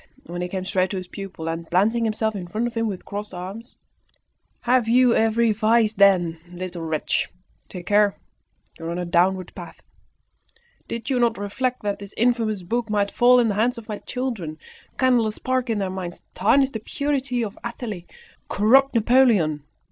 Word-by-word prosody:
Then 175 +1 -5
he 180 - -2
came 185 0 -4
straight 185 0 +1
to 195 - -3
his 185 - -5
pupil, 190 -4 -7
and, 165 0 -4
planting 225 +6 +2
himself 220 0 -1
in 180 -3 -5
front 215 +6 -2
of 240 - -3
him 230 -1 0
with 195 -4 -5
crossed 205 -1 -6
arms 195 +7 -8 0.9
"Have 245 -1 +2
you 245 +1 +5
every 225 +1 +3
vice, 220 +1 +3
then, 185 -6 +4
little 180 -1 -6
wretch? 160 -2 -1 0.4
Take 180 -2 -8
care! 205 0 +3 0.6
you 165 - -7
are - - -3
on 170 - -3
a 180 - -2
downward 180 +1 +1
path. - - -11 1.0
Did 230 0 -4
not 240 -3 +2
you 205 - -5
reflect 250 +5 -2
that 205 -1 -2
this 200 0 -10
infamous 225 -4 +1
book 230 +5 -2
might 205 -1 +1
fall 250 +1 +5
in 235 -2 +3
the - - 0
hands 235 +5 +1
of 230 - -9
my 210 -2 -5
children, 225 -12 -4 0.4
kindle 250 -4 +3
a - - -1
spark 255 +3 -2
in 225 - +1
their 195 -2 -2
minds, 180 -2 -6
tarnish 265 +8 +3
the 220 - -4
purity 270 0 -1
of 205 -3 -5
Athalie, 220 -6 -6 0.4
corrupt 260 +7 +4
Napoleon. 220 - +3
215 Hz, 185 wpm, -23 LUFS, 185-235 Hz, 1.0 s, you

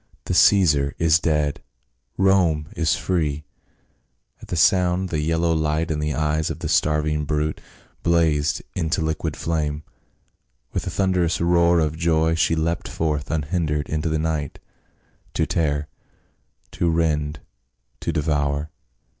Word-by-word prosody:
" - - -39
The - - -2
Caesar 75 -8 +4
is 80 -1 +4
dead! 75 -3 0 0.6
Rome 90 -6 +2
is 80 -2 +1
free 75 -5 -1 0.5
!" - - -45
At - - -11
the - - -3
sound 90 +2 +3
the 80 - -1
yellow 80 +2 +1
light 80 +1 0
in 75 - -1
the 75 -2 -1
eyes 75 +1 0
of - - -4
the - - -5
starving 75 0 +1
brute 75 +1 -1 0.4
blazed 80 -3 +1
into 80 +2 -1
liquid 80 0 -2
flame; 75 -2 -2 0.9
with - - -3
a - - 0
thunderous 90 -4 +1
roar 85 0 +3
of 80 -1 +1
joy 80 -1 +2
she 80 0 +2
leapt 80 +1 -1
forth 75 -3 -2
unhindered 75 -1 -1
into 80 +1 -1
the 80 - 0
night, 80 -3 -2 0.8
to - - +1
tear, 75 -2 -1 0.8
to 85 - 0
rend, 75 -2 0 0.6
to - - -2
devour. 75 0 -1
80 Hz, 140 wpm, -22 LUFS, 75-85 Hz, 0.9 s, Caesar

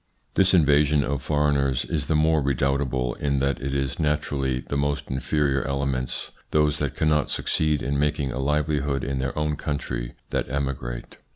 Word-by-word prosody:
This 95 0 +4
invasion 75 -2 +4
of 70 0 -2
foreigners 70 -2 +1
is 75 -4 -2
the 80 - +1
more 80 0 +3
redoubtable, 70 -2 0
in 70 -1 0
that 70 +1 0
it 70 0 -2
is 70 +2 -2
naturally 70 -4 0
the 70 - -5
most 70 -1 -1
inferior 70 +1 +1
elements, 70 -2 -2 0.2
those 75 -1 +2
that 70 -3 -2
cannot 75 -1 +2
succeed 75 -2 0
in 70 +1 0
making 75 -2 0
a 60 - -4
livelihood 75 -1 0
in 70 -1 -2
their 65 +2 -2
own 75 -1 0
country, - - -3 0.2
that - - -1
emigrate. 65 -3 -4
70 Hz, 165 wpm, -25 LUFS, 65-75 Hz, 0.2 s, This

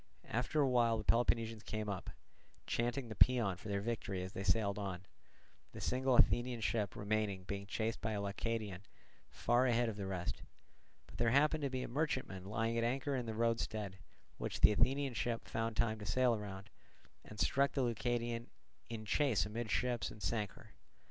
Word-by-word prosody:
After 125 +7 0
a 140 - +5
while 120 -3 +3
the 110 - -4
Peloponnesians 115 -1 +2
came 110 0 -4
up, 100 -3 -4 0.6
chanting 120 +2 -1
the 110 - -6
paean 115 -5 +4
for 95 - -11
their 100 0 0
victory 100 -4 -2
as 95 - -7
they - - -4
sailed 100 +1 +2
on; 95 -2 -4 0.7
the - - -7
single 130 0 +1
Athenian 120 0 +4
ship 110 -2 0
remaining 105 -2 -1
being 100 +1 -5
chased 110 +3 -2
by 110 0 -1
a 105 - -1
Leucadian 100 -1 -3 0.5
far 120 +2 +2
ahead 120 -1 +2
of 105 - -5
the 100 -2 -3
rest. 90 -2 -3 0.6
But - - -13
there 115 - +3
happened 150 +5 +4
to 140 - 0
be 130 -1 -2
a - - -4
merchantman 130 - -2
lying 115 +3 0
at - - +1
anchor 135 +4 0
in 125 -3 -2
the 110 - -3
roadstead, 110 -4 -1 0.4
which - - -3
the - - +8
Athenian 135 +4 +2
ship 115 +2 -2
found 115 0 -2
time 110 -2 +1
to 105 - -7
sail 125 0 +3
round, 105 0 -7 0.5
and 105 - -11
struck 140 +1 +2
the 135 - +1
Leucadian 120 0 -1 0.4
in 110 -2 -5
chase 125 -1 +2
amidships 120 +2 -1
and 105 - -10
sank 105 -4 -1
her. - - -16
115 Hz, 180 wpm, -36 LUFS, 105-120 Hz, 0.7 s, the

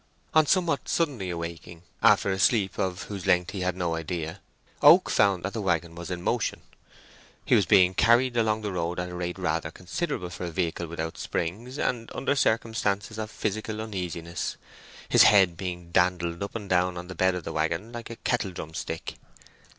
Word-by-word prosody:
On 155 -1 +5
somewhat 175 -1 +1
suddenly 135 - 0
awaking, 85 0 -6 0.2
after 100 - +5
a 95 - -2
sleep 100 -1 +2
of 95 0 -1
whose 100 -4 -6
length 90 0 +3
he 100 - -5
had 90 0 -1
no 85 -2 -1
idea, 80 0 -4 0.4
Oak - - +7
found 95 -3 +3
that 95 - -3
the 110 - -3
waggon 85 -3 0
was 85 +1 -8
in 90 -1 -4
motion. - - -1 0.8
He - - +2
was - - +4
being 90 -1 +5
carried 120 +5 +4
along 110 -2 +1
the 105 - -2
road 90 -1 -2
at 90 0 -3
a - - -8
rate 90 0 -3
rather 80 -3 -1
considerable 90 - -4
for 90 0 -5
a - - -3
vehicle 85 0 -2
without 80 0 -5
springs, 115 - -3
and 115 -5 -2
under 140 - 0
circumstances 110 -4 0
of 110 -1 -4
physical 110 0 -3
uneasiness, 90 -5 -4 0.5
his - - +5
head 95 -4 +6
being 90 -1 -6
dandled 90 -1 +1
up 100 - -5
and 105 -3 -5
down 90 -1 +1
on 90 0 -7
the 90 - -7
bed 95 0 +2
of 90 - -5
the - - -5
waggon 80 +8 -1
like 120 -1 -7
a 115 - -6
kettledrum 95 -10 -3
stick. 80 0 -5
90 Hz, 190 wpm, -27 LUFS, 85-110 Hz, 0.8 s, Oak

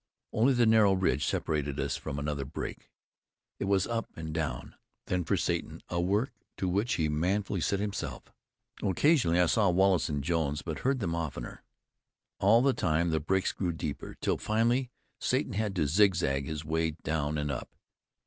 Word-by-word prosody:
Only 125 +5 +4
the 120 -1 +4
narrow 110 -3 +5
ridge 95 0 +1
separated 75 -2 -1
us - - -1
from 70 - -5
another 70 -1 -2
break. 70 +3 -6 0.7
It - - -1
was 95 -1 +2
up 115 -1 -2
and 80 -1 -5
down 80 -2 -3 0.3
then 90 -1 0
for - - +1
Satan, - - -2
a 85 - 0
work 100 +8 +1 0.3
to 95 - -1
which 100 +7 +1
he 80 - +1
manfully 95 +5 0
set 100 +4 +1
himself. 100 -1 -4 0.5
Occasionally 95 - +3
I 90 - +5
saw 100 +3 +3
Wallace 95 -1 +3
and 70 -2 -2
Jones, 80 -2 0
but 80 -3 -4
heard 130 -1 0
them 85 -4 -1
oftener. 75 -7 -5 0.8
All 115 +5 +5
the 135 -1 +4
time 85 -3 +1
the 80 - +1
breaks 95 +5 +1
grew 90 -3 -2
deeper, 75 -2 -5
till - - 0
finally 120 +4 +1 0.3
Satan - - 0
had 105 -1 -1
to 85 - +1
zigzag 80 -5 +2
his 80 0 -4
way 80 0 0
down 75 -1 -1
and 75 -1 -1
up. 65 - -6
90 Hz, 175 wpm, -30 LUFS, 75-100 Hz, 0.8 s, narrow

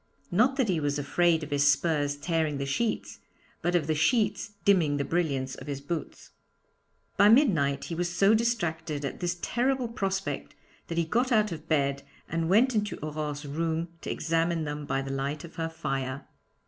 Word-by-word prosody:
Not 240 +9 +3
that 265 -4 +1
he 180 -5 +1
was 145 -1 0
afraid 160 +3 +2
of 150 - -7
his 145 0 +4
spurs 145 -1 0
tearing 155 -1 -1
the 140 - -2
sheets, 225 +12 -2 0.4
but 175 +1 0
of 165 -4 +2
the 155 - +1
sheets 205 +6 +1
dimming 165 -8 +4
the 140 - -1
brilliance 140 -6 -1
of - - -9
his 140 -2 -3
boots. 155 +4 -6 0.9
By 205 - +7
midnight 180 - +4
he - - -5
was 175 +1 -1
so 195 +4 +4
distracted 165 -10 -1
at - - -5
this 175 0 -1
terrible 255 +1 +1
prospect 195 -4 -3 0.3
that 165 - -4
he 170 - +2
got 245 +10 +1
out 215 -3 +3
of 160 -1 -7
bed 140 -3 +1 0.3
and 165 0 -1
went 240 +7 +4
into 210 -1 -1
Aurore's 150 -1 -4
room 165 +3 -2
to - - -6
examine 165 +1 0
them 145 -1 -5
by 135 - 0
the 135 - -5
light 140 +2 -3
of 170 - -12
her 165 0 -1
fire. 135 -4 -3
165 Hz, 185 wpm, -28 LUFS, 145-195 Hz, 0.9 s, By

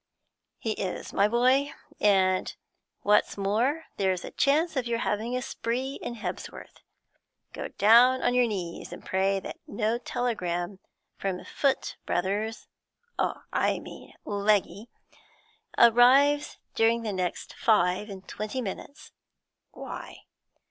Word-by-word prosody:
'He 225 - -3
is, 190 -3 -4
my 200 - +4
boy. 255 +5 +3 0.3
And 190 -2 +2 0.5
what's 210 0 +2
more, 230 +11 0
there's 190 -2 0
a - - -8
chance 310 +4 +2
of 255 -3 -1
your 235 -1 0
having 230 +2 -1
a 255 - -3
spree 255 +5 -3
in 240 - -5
Hebsworth. 190 -5 -7 0.7
Go - - -5
down 240 +5 +5
on 245 - +2
your 250 -1 +4
knees 180 -6 -5
and - - -10
pray 195 +1 +1
that - - -8
no 220 +3 -1
telegram 190 -7 -2 0.4
from 190 -2 -3
Foot 275 -2 -1
Brothers 205 +5 -1 0.5
I - - 0
mean, - - -11
Legge 205 0 0 0.9
arrives 265 +5 +5 0.2
during 230 +1 +2
the 215 -2 -2
next 180 -2 -3
five 210 -1 +2
and 195 -1 -9
twenty 215 +5 -4
minutes.' 255 +6 -7 0.6
'Why?' - - -9
220 Hz, 120 wpm, -27 LUFS, 195-245 Hz, 0.9 s, down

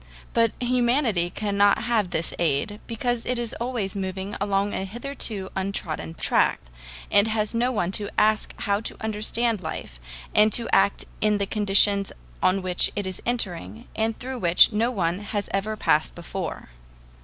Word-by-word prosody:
But 230 -1 +3
humanity 240 -6 +1
cannot 205 +1 +2
have 225 -6 +1
this 165 -1 -2
aid, 170 +6 0
because 235 +1 -2
it 250 - -2
is 235 -2 -2
always 235 -6 -2
moving 190 +1 -4
along 200 0 0
a - - -2
hitherto 215 -2 -3
untrodden 190 -4 -3
track, - - +1 0.5
and 205 +2 +5
has 215 -1 -1
no 240 +2 +1
one 185 -7 -1
to 205 +1 -2
ask 215 0 +2
how 200 0 +1
to - - -5
understand 220 0 0
life, 110 - -6 0.3
and 215 +1 +5
to 235 - +3
act 195 +1 +3 0.2
in 210 -1 +3
the 200 - 0
conditions 200 -1 +3 0.3
on 185 +1 +2
which 180 -1 +3
it 205 -2 -2
is 185 -1 -3
entering 225 -1 -1
and 220 0 -1
through 260 0 -5
which 175 0 +6
no 225 +3 +1
one 180 -6 -1
has 205 0 -4
ever 210 +2 -1
passed 155 -6 +1
before. 175 - -6
205 Hz, 160 wpm, -24 LUFS, 190-230 Hz, 0.5 s, which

